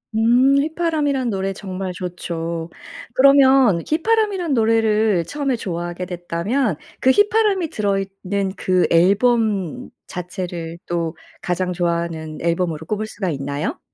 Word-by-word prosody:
음. 245 Hz, +5 st, +4 dB
휘파람이란 300 Hz, -5 st, 0 dB
노래 195 Hz, -2 st, -1 dB
정말 190 Hz, -1 st, -5 dB
좋죠. 170 Hz, -2 st, -5 dB, 0.4 s
그러면 265 Hz, -8 st, +5 dB
휘파람이란 385 Hz, -1 st, +1 dB
노래를 220 Hz, -5 st, +2 dB
처음에 280 Hz, -, -1 dB
좋아하게 175 Hz, -3 st, -4 dB
됐다면 180 Hz, -, -1 dB, 0.2 s
그 260 Hz, -, +4 dB
휘파람이 410 Hz, 0 st, +3 dB
들어있는 195 Hz, -2 st, -2 dB
그 185 Hz, -1 st, +1 dB
앨범 200 Hz, -, +2 dB, 0.2 s
자체를 175 Hz, -2 st, -5 dB
또 170 Hz, -1 st, -2 dB, 0.3 s
가장 180 Hz, 0 st, -1 dB
좋아하는 170 Hz, -3 st, -2 dB
앨범으로 170 Hz, -2 st, -1 dB
꼽을 215 Hz, +4 st, -2 dB
수가 200 Hz, -3 st, -4 dB
있나요? 145 Hz, -, -3 dB
195 Hz, 285 characters per minute, -20 LUFS, 175-260 Hz, 0.4 s, 그러면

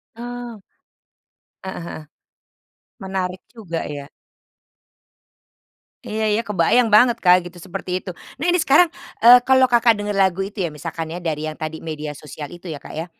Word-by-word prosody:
Ah. 240 Hz, -1 st, -7 dB, 1.0 s
Heeh 190 Hz, -2 st, -6 dB
heeh. -, -, -7 dB, 1.0 s
Menarik 190 Hz, -1 st, -3 dB
juga 180 Hz, -8 st, -5 dB, 0.2 s
ya. 140 Hz, 0 st, -8 dB, 2.0 s
Iya 220 Hz, +1 st, -3 dB
iya, 215 Hz, -, +2 dB
kebayang 210 Hz, +5 st, +3 dB
banget 240 Hz, +2 st, +5 dB
Kak 180 Hz, -2 st, +5 dB
gitu, 175 Hz, 0 st, -11 dB
seperti 180 Hz, +1 st, -4 dB
itu. 185 Hz, -, -7 dB, 0.3 s
Nah 305 Hz, -, -2 dB
ini 350 Hz, -, +3 dB
sekarang, 315 Hz, +3 st, +5 dB, 0.3 s
eee, 245 Hz, +2 st, +9 dB
kalau 260 Hz, 0 st, +5 dB
Kakak 235 Hz, -3 st, +3 dB
dengar 205 Hz, 0 st, -3 dB
lagu 190 Hz, -2 st, +2 dB
itu 200 Hz, -1 st, -4 dB
ya, 170 Hz, -, -2 dB
misalkan 160 Hz, +1 st, -6 dB
ya 175 Hz, -, -5 dB
dari 155 Hz, -3 st, -3 dB
yang 155 Hz, +1 st, -5 dB
tadi 155 Hz, 0 st, -5 dB
media 150 Hz, -2 st, -5 dB
sosial 150 Hz, 0 st, -8 dB
itu 175 Hz, -1 st, -9 dB
ya 145 Hz, -, -6 dB
Kak -, -, -11 dB
ya. 160 Hz, +2 st, -3 dB
185 Hz, 160 wpm, -21 LUFS, 165-230 Hz, 2.0 s, eee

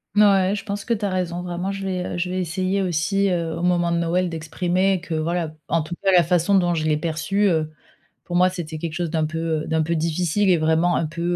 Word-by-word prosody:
Ouais. 200 Hz, -2 st, +4 dB
Je 205 Hz, -, -6 dB
pense 200 Hz, -1 st, -4 dB
que 235 Hz, -, 0 dB
tu 210 Hz, -2 st, -2 dB
as -, -, 0 dB
raison, 180 Hz, -2 st, -2 dB
vraiment, 180 Hz, +2 st, -3 dB
je 195 Hz, 0 st, -5 dB
vais, 185 Hz, -2 st, -2 dB
heu, -, -, -4 dB
je 180 Hz, +1 st, -1 dB
vais 185 Hz, +1 st, -1 dB
essayer 185 Hz, +3 st, -1 dB
aussi, 190 Hz, +3 st, +1 dB
heu, 170 Hz, -3 st, -1 dB
au -, -, -4 dB
moment 175 Hz, -1 st, +2 dB
de -, -, +1 dB
Noël 170 Hz, +2 st, +1 dB
d'exprimer 180 Hz, +4 st, 0 dB
que, 170 Hz, -1 st, -7 dB
voilà, 160 Hz, 0 st, -2 dB
en 165 Hz, -, +2 dB
tout 155 Hz, +3 st, -6 dB
cas, 195 Hz, -, +4 dB
la 180 Hz, -2 st, +6 dB
façon 175 Hz, +3 st, +1 dB
dont 175 Hz, -2 st, +3 dB
je 155 Hz, -, -1 dB
l'ai 155 Hz, -1 st, +2 dB
perçu, 165 Hz, +5 st, -1 dB
heu, 160 Hz, -4 st, 0 dB, 0.5 s
pour 175 Hz, -, -4 dB
moi, 180 Hz, +1 st, +5 dB
c'était 165 Hz, -4 st, -6 dB
quelque 165 Hz, 0 st, -4 dB
chose 170 Hz, +1 st, -2 dB
d'un 160 Hz, -1 st, 0 dB
peu, 160 Hz, 0 st, -2 dB
heu, -, -, -9 dB
d'un 160 Hz, 0 st, +1 dB
peu 165 Hz, +2 st, -1 dB
difficile 170 Hz, +5 st, 0 dB
et 180 Hz, -2 st, +4 dB
vraiment 160 Hz, +2 st, +2 dB
un 165 Hz, -, 0 dB
peu, 170 Hz, +2 st, -6 dB
175 Hz, 255 wpm, -22 LUFS, 160-185 Hz, 0.5 s, la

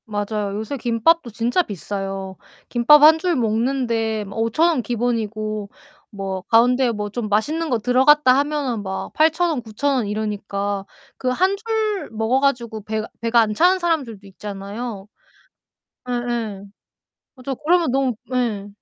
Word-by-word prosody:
맞아요. 205 Hz, -1 st, -3 dB
요새 220 Hz, +7 st, -4 dB
김밥도 245 Hz, +5 st, +2 dB
진짜 235 Hz, -, +1 dB
비싸요. 195 Hz, -, -5 dB, 0.3 s
김밥 255 Hz, +5 st, +6 dB
1 315 Hz, +1 st, +8 dB
줄 355 Hz, 0 st, 0 dB
먹는데 230 Hz, -1 st, 0 dB
뭐 200 Hz, +2 st, -7 dB
5,000 230 Hz, +9 st, +2 dB
원 320 Hz, -7 st, +1 dB
기본이고 215 Hz, -3 st, -2 dB, 0.4 s
뭐 195 Hz, -2 st, -5 dB
가운데 245 Hz, +2 st, +4 dB
뭐 210 Hz, -2 st, -4 dB
좀 215 Hz, 0 st, -4 dB
맛있는 305 Hz, +11 st, 0 dB
거 245 Hz, -, +2 dB
들어갔다 255 Hz, +4 st, +4 dB
하면은 285 Hz, -6 st, -1 dB
막 190 Hz, -1 st, -5 dB
8,000 320 Hz, +3 st, +3 dB
원, 300 Hz, -6 st, -1 dB
9,000 235 Hz, +5 st, -1 dB
원 240 Hz, -5 st, 0 dB
이러니까 205 Hz, -1 st, -3 dB, 0.3 s
그 255 Hz, -, -1 dB
1 370 Hz, +10 st, +2 dB
줄 430 Hz, -1 st, -2 dB
먹어 225 Hz, +4 st, +1 dB
가지고 235 Hz, -5 st, -1 dB
배가 220 Hz, +1 st, -3 dB
배가 230 Hz, +1 st, +3 dB
안 215 Hz, -1 st, 0 dB
차는 360 Hz, -, +4 dB
사람들도 275 Hz, -, -2 dB
있잖아요. 200 Hz, +2 st, -7 dB, 1.0 s
예예. 240 Hz, -5 st, -3 dB, 0.7 s
맞아요. 265 Hz, +1 st, -5 dB
그러면 340 Hz, -3 st, +3 dB
너무 265 Hz, -1 st, +1 dB, 0.2 s
예. 225 Hz, -5 st, -1 dB
235 Hz, 260 characters per minute, -21 LUFS, 210-275 Hz, 1.0 s, 1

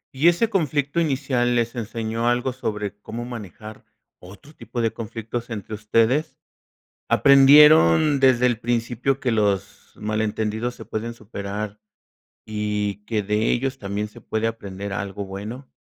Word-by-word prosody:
Y 145 Hz, +6 st, +3 dB
ese 175 Hz, +7 st, +4 dB
conflicto 150 Hz, -5 st, 0 dB
inicial, 130 Hz, -5 st, 0 dB
¿les 120 Hz, 0 st, 0 dB
enseñó 115 Hz, 0 st, -3 dB
algo 125 Hz, +2 st, 0 dB
sobre 105 Hz, -5 st, -4 dB
cómo 120 Hz, +3 st, -6 dB
manejar 110 Hz, -2 st, -9 dB, 0.4 s
otro 100 Hz, -, -14 dB
tipo 115 Hz, -3 st, -7 dB
de 115 Hz, -1 st, 0 dB
conflictos 115 Hz, +2 st, -6 dB
entre 110 Hz, -1 st, -6 dB
ustedes? 115 Hz, +7 st, +1 dB, 0.7 s
¿Aprendieron 140 Hz, -, +6 dB
desde 125 Hz, -2 st, +4 dB
el 120 Hz, -2 st, -1 dB
principio 120 Hz, +3 st, -1 dB
que 125 Hz, -, 0 dB
los 100 Hz, -2 st, -1 dB
malentendidos 110 Hz, +2 st, -2 dB
se -, -, -10 dB
pueden 115 Hz, +2 st, -4 dB
superar 105 Hz, -1 st, -6 dB, 0.7 s
y 105 Hz, -1 st, -2 dB
que 105 Hz, -3 st, -1 dB
de 105 Hz, +2 st, +1 dB
ellos 135 Hz, +2 st, -1 dB
también 100 Hz, +1 st, -3 dB
se 105 Hz, -, -14 dB
puede 110 Hz, +1 st, -2 dB
aprender 100 Hz, -3 st, -5 dB
algo 100 Hz, 0 st, -4 dB
bueno? 105 Hz, +7 st, -8 dB
115 Hz, 135 wpm, -23 LUFS, 105-125 Hz, 0.7 s, Aprendieron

